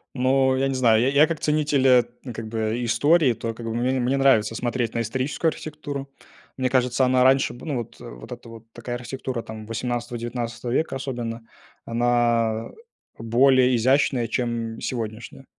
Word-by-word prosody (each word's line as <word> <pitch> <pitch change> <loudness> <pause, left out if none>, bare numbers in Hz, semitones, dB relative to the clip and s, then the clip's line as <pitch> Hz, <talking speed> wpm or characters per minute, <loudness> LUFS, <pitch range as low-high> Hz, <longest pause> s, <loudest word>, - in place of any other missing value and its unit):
Ну, 130 +1 +2
я 135 +1 +1
не 135 - -1
знаю, 115 -4 +4
я 125 - +2
я 140 +3 +5
как 165 0 -3
ценитель, 150 -3 +1
э, 125 -2 +6
т 120 +2 -11
как 115 -1 -7
бы, 110 +1 -2
истории, 145 +4 +3
то 115 0 -5
как 115 0 -8
бы, 115 - -3
мне 125 +2 0
мне 125 +3 +1
нравится 130 -5 +3
смотреть 120 -1 -2
на 115 - 0
историческую 130 +8 -1
архитектуру. 145 -3 -7 0.5
Мне 130 -1 0
кажется, 125 0 +2
она 130 0 +3
раньше 135 +1 +3
был, 120 - -11
ну 145 - -1
вот 120 - -7
вот - - -10
это - - -9
вот 115 -1 -12
такая 120 +1 -5
архитектура 125 0 -5
там 110 -1 -9
18-19 120 0 -4
века 155 +1 0
особенно, 120 -4 -4 0.4
она 115 -1 +1 0.5
более 125 +2 +4
изящная, 130 0 +2
чем 115 -1 -3
сегодняшняя. 115 +2 -5
120 Hz, 170 wpm, -24 LUFS, 115-130 Hz, 0.5 s, э